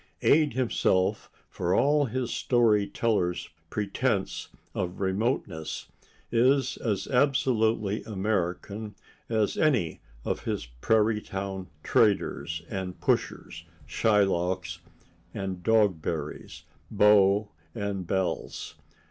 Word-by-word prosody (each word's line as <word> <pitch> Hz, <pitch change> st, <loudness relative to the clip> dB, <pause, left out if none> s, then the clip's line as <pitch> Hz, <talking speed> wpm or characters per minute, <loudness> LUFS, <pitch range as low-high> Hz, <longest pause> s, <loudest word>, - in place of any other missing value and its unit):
Ade 150 Hz, -3 st, +4 dB
himself, 115 Hz, -7 st, +1 dB, 0.2 s
for 90 Hz, +1 st, -1 dB
all 145 Hz, +3 st, +3 dB
his 125 Hz, 0 st, -3 dB
story 110 Hz, -5 st, +3 dB
teller's 95 Hz, -7 st, 0 dB, 0.2 s
pretense 105 Hz, +1 st, -1 dB, 0.3 s
of 90 Hz, 0 st, -3 dB
remoteness, 95 Hz, -, -2 dB, 0.4 s
is 130 Hz, +3 st, +3 dB
as 100 Hz, -4 st, -1 dB
absolutely 115 Hz, -6 st, +2 dB
American 105 Hz, 0 st, -2 dB, 0.3 s
as 110 Hz, -3 st, +1 dB
any 125 Hz, -, +1 dB, 0.2 s
of -, -, -2 dB
his -, -, -2 dB
prairie 105 Hz, -, +1 dB
town 95 Hz, -1 st, -5 dB, 0.2 s
traders 80 Hz, -7 st, +1 dB
and 95 Hz, -2 st, -5 dB
pushers, 85 Hz, -, -1 dB, 0.2 s
Shylocks 95 Hz, -2 st, +1 dB, 0.6 s
and 95 Hz, -2 st, -4 dB
Dogberries, 90 Hz, -8 st, 0 dB, 0.3 s
beaux 105 Hz, -1 st, +4 dB, 0.2 s
and 100 Hz, -3 st, -3 dB
belles. 95 Hz, -1 st, -2 dB
100 Hz, 90 wpm, -27 LUFS, 95-115 Hz, 0.6 s, Ade